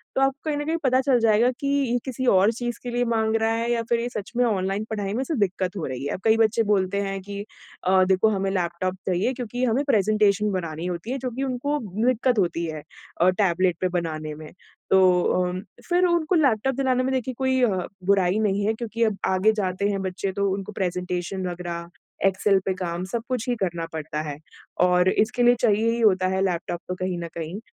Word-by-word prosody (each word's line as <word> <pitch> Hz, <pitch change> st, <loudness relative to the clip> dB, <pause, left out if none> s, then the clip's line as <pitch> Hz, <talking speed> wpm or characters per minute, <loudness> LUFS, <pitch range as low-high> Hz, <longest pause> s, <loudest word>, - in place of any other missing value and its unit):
तो 270 Hz, -, +2 dB
आपको 270 Hz, +1 st, +2 dB
कहीं 290 Hz, -, 0 dB
न 295 Hz, -, -3 dB
कहीं 325 Hz, +2 st, 0 dB
पता 260 Hz, -1 st, +3 dB
चल 260 Hz, -2 st, +3 dB
जाएगा 230 Hz, +2 st, +4 dB
कि 280 Hz, -, -2 dB
ये 275 Hz, -4 st, +1 dB
किसी 260 Hz, -1 st, -3 dB
और 195 Hz, +3 st, +5 dB
चीज़ 240 Hz, 0 st, -4 dB
के 245 Hz, -, -4 dB
लिए 245 Hz, 0 st, 0 dB
माँग 225 Hz, -1 st, +1 dB
रहा 225 Hz, 0 st, +2 dB
है 230 Hz, +1 st, -1 dB
या 235 Hz, -1 st, +1 dB
फिर 235 Hz, -1 st, +2 dB
ये 240 Hz, -, -2 dB
सच 210 Hz, -3 st, -6 dB
में 245 Hz, -, +4 dB
ऑनलाइन 195 Hz, -2 st, 0 dB
पढ़ाई 205 Hz, -2 st, -3 dB
में 250 Hz, -, -1 dB
इसे 300 Hz, +3 st, -2 dB
दिक्कत 190 Hz, -1 st, -1 dB
हो 170 Hz, -, -3 dB
रही 130 Hz, +1 st, -5 dB
है। -, -, -2 dB
अब 185 Hz, -, -6 dB
कई 220 Hz, 0 st, +4 dB
बच्चे 225 Hz, 0 st, +3 dB
बोलते 200 Hz, 0 st, +1 dB
हैं 195 Hz, -1 st, -3 dB
कि 200 Hz, +1 st, -7 dB, 0.5 s
अ, 185 Hz, 0 st, +5 dB
देखो 190 Hz, +3 st, +3 dB
हमें 195 Hz, -2 st, 0 dB
लैपटॉप 180 Hz, 0 st, -1 dB
चाहिए 190 Hz, +7 st, +1 dB
क्योंकि 245 Hz, 0 st, -4 dB
हमें 250 Hz, +4 st, +1 dB
प्रेजेंटेशन 210 Hz, -2 st, +3 dB
बनानी 170 Hz, -3 st, -4 dB
होती 180 Hz, +6 st, -4 dB
है, 270 Hz, -, -1 dB
जो 255 Hz, -1 st, -4 dB
कि 265 Hz, +4 st, -3 dB
उनको 275 Hz, +3 st, -1 dB, 0.3 s
दिक्कत 250 Hz, -1 st, +2 dB
होती 170 Hz, -2 st, 0 dB
है 155 Hz, -2 st, -6 dB, 0.4 s
अ, 180 Hz, -, +6 dB
टैबलेट 185 Hz, -2 st, +1 dB
पे 185 Hz, -, +2 dB
बनाने 155 Hz, -2 st, -4 dB
में। 155 Hz, 0 st, -10 dB, 0.4 s
तो 190 Hz, -, +5 dB, 0.2 s
अ, 180 Hz, 0 st, 0 dB, 0.3 s
फिर 360 Hz, +1 st, +3 dB
उनको 345 Hz, 0 st, +2 dB
लैपटॉप 270 Hz, -4 st, +2 dB
दिलाने 260 Hz, -1 st, +1 dB
में 265 Hz, +1 st, 0 dB
देखिए 260 Hz, 0 st, -1 dB
कोई 260 Hz, -1 st, +1 dB
अ, 200 Hz, -6 st, +2 dB, 0.3 s
बुराई 195 Hz, 0 st, +3 dB
नहीं 205 Hz, -1 st, +1 dB
है 220 Hz, -, +2 dB
क्योंकि 230 Hz, 0 st, -2 dB
अब 215 Hz, -3 st, +1 dB
आगे 190 Hz, +3 st, +3 dB
जाते 185 Hz, +1 st, -1 dB
हैं 200 Hz, -1 st, -1 dB
बच्चे 190 Hz, +1 st, -3 dB
तो 200 Hz, +1 st, 0 dB
उनको 195 Hz, +1 st, -5 dB
प्रेजेंटेशन 180 Hz, 0 st, -3 dB
वग़ैरह 175 Hz, -1 st, -5 dB, 0.4 s
एक्सेल 195 Hz, +1 st, +3 dB
पे 190 Hz, -, +1 dB
काम 180 Hz, -1 st, -4 dB
सब 230 Hz, +4 st, -3 dB
कुछ 250 Hz, -2 st, -2 dB
ही 245 Hz, -, +1 dB
करना 170 Hz, -3 st, -1 dB
पड़ता 155 Hz, -1 st, -4 dB
है। 145 Hz, -, -5 dB, 0.4 s
और 180 Hz, 0 st, +4 dB
इसके 245 Hz, +5 st, +1 dB
लिए 245 Hz, 0 st, +6 dB
चाहिए 220 Hz, +2 st, +3 dB
ही 235 Hz, -, -2 dB
होता 185 Hz, -4 st, +4 dB
है 190 Hz, +1 st, 0 dB
लैपटॉप 175 Hz, -2 st, -2 dB
तो 180 Hz, -, -3 dB
कहीं 185 Hz, -1 st, -3 dB
न 170 Hz, -, -4 dB
कहीं, 165 Hz, +4 st, -5 dB
200 Hz, 225 wpm, -24 LUFS, 185-240 Hz, 0.5 s, अ